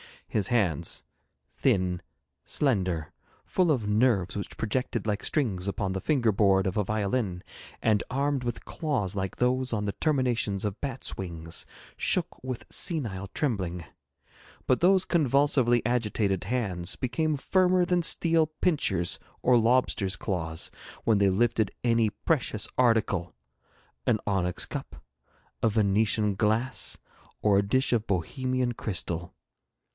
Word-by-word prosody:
His 100 -4 0
hands 90 -9 0 0.5
thin, 90 -1 +1 0.4
slender, 95 - 0 0.3
full 180 -2 +1
of 125 -9 +1
nerves 105 -4 +2
which 100 - -5
projected 120 0 -2
like 105 0 -1
strings 100 - 0
upon 100 -1 -1
the 95 - -2
finger 130 -8 +2
board 95 -2 +3
of 95 0 -1
a 105 - +2
violin, 105 -2 -1 0.4
and 110 -2 +3
armed 140 0 0
with 120 -1 -4
claws 125 - -2
like 95 -1 -3
those 125 0 +1
on 105 -1 -1
the 100 - 0
terminations 120 -6 0
of 105 0 -3
bats' 135 -2 -3
wings 85 -3 -5 0.3
shook - - 0
with 130 -2 -5
senile 110 - -1
trembling; 95 - -2 0.8
but 130 - +2
those 185 +1 +4
convulsively 140 -6 +3
agitated 105 -5 0
hands 95 -7 -2
became 155 +4 -1
firmer 185 +4 +3
than 175 -1 +2
steel 165 -1 +3
pincers 145 - 0 0.2
or 125 -1 +5
lobsters' 115 -5 +2
claws 80 -5 -3 0.3
when 110 -2 +3
they 100 -1 +4
lifted 110 +1 +1
any 115 -2 +3
precious 110 -1 0
article 110 -8 +2 0.7
an 115 - +4
onyx 90 -3 0
cup, - - -6 0.7
a 115 - +3
Venetian 105 0 +2
glass, 115 +5 0 0.5
or 100 -2 +5
a 100 - -1
dish 130 +4 +2
of 115 -2 0
Bohemian 125 - -1
crystal. 85 -6 -3
110 Hz, 130 wpm, -28 LUFS, 95-130 Hz, 0.8 s, or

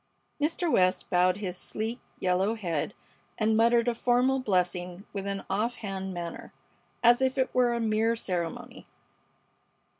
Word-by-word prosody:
Mr. 330 +4 0
West 185 -3 +2
bowed 180 +1 +3
his 190 -4 -4
sleek, 220 +6 -3 0.2
yellow 185 +4 +1
head 180 -3 -3 0.4
and 220 0 +2
muttered 235 +1 +4
a 240 - +3
formal 250 +3 +2
blessing 180 -3 -1
with 200 -1 -4
an 200 -1 -3
offhand 195 -2 -2
manner, 170 -2 -6 0.5
as 240 +2 +6
if 260 0 +1
it 260 -1 0
were 250 -1 +3
a 235 - -1
mere 225 0 +1
ceremony. 175 -6 -4
215 Hz, 140 wpm, -28 LUFS, 185-235 Hz, 0.5 s, as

